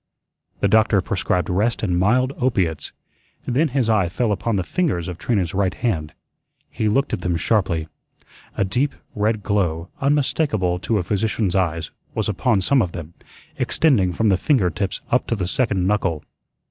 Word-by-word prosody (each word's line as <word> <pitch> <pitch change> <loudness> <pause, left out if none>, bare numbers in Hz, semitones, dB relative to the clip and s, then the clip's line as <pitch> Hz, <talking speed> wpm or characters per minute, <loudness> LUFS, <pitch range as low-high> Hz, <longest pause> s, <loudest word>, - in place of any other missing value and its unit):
The - - +3
doctor 110 0 +4
prescribed 90 -1 -1
rest 105 +7 0
and 90 -4 +1
mild 125 +7 +2
opiates. 95 - 0 0.5
Then 135 +6 +2
his 130 -4 0
eye 105 -6 +2
fell 110 +5 0
upon 105 +3 -1
the 95 - 0
fingers 110 - -1
of 90 -2 -6
Trina's 95 -5 0
right 95 -2 0
hand. 80 -11 -2 0.6
He 110 - 0
looked 135 +6 +1
at - - -1
them 90 -1 0
sharply. 85 -4 0 0.7
A 100 - +2
deep 125 +9 0 0.2
red 105 0 0
glow, 90 -5 0
unmistakable 135 - +1
to 110 +3 0
a 95 - 0
physician's 105 0 0
eyes, 85 -4 0 0.2
was 110 - 0
upon 105 +1 +1
some 135 +7 +3
of 90 -5 -2
them, 85 0 -7 0.4
extending 115 - +2
from 110 +5 +1
the 95 - +4
finger 100 - +2
tips 95 +1 -3
up - - +2
to - - 0
the 95 -4 -2
second 100 -2 0
knuckle. 95 -6 0
100 Hz, 170 wpm, -21 LUFS, 90-115 Hz, 0.7 s, doctor